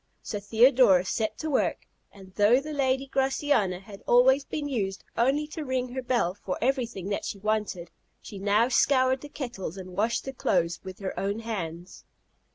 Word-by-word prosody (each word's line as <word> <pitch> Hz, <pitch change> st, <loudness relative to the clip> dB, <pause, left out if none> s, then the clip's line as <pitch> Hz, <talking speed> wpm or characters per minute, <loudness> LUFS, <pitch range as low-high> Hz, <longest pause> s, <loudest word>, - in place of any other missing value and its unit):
So 205 Hz, -, -4 dB
Theodorus 220 Hz, -3 st, +4 dB
set 220 Hz, -1 st, -1 dB
to 315 Hz, -, -4 dB
work; 265 Hz, -, 0 dB, 0.3 s
and 190 Hz, -2 st, -15 dB
though 210 Hz, +6 st, +4 dB
the 305 Hz, +2 st, -6 dB
lady 265 Hz, -1 st, +1 dB
Graciana 265 Hz, -8 st, +1 dB
had 195 Hz, +1 st, -12 dB
always 265 Hz, +3 st, +5 dB
been 290 Hz, +1 st, -4 dB
used 195 Hz, -8 st, -3 dB
only 270 Hz, +6 st, +2 dB
to 310 Hz, 0 st, -5 dB
ring 255 Hz, -2 st, -2 dB
her 260 Hz, +1 st, -4 dB
bell 240 Hz, -8 st, 0 dB
for 190 Hz, -2 st, -5 dB
everything 235 Hz, -7 st, -1 dB
that 200 Hz, -, -2 dB
she -, -, -4 dB
wanted, 210 Hz, -4 st, -2 dB, 0.3 s
she 200 Hz, -, -10 dB
now 205 Hz, +4 st, +3 dB
scoured 260 Hz, 0 st, +3 dB
the 290 Hz, -, -9 dB
kettles 235 Hz, -, -6 dB
and 185 Hz, -1 st, -8 dB
washed 225 Hz, +4 st, 0 dB
the 270 Hz, -, -5 dB
clothes 170 Hz, -8 st, 0 dB
with 190 Hz, -1 st, -8 dB
her 190 Hz, -, -3 dB
own 200 Hz, +2 st, -1 dB
hands. 180 Hz, -6 st, -6 dB
225 Hz, 175 wpm, -27 LUFS, 195-265 Hz, 0.3 s, always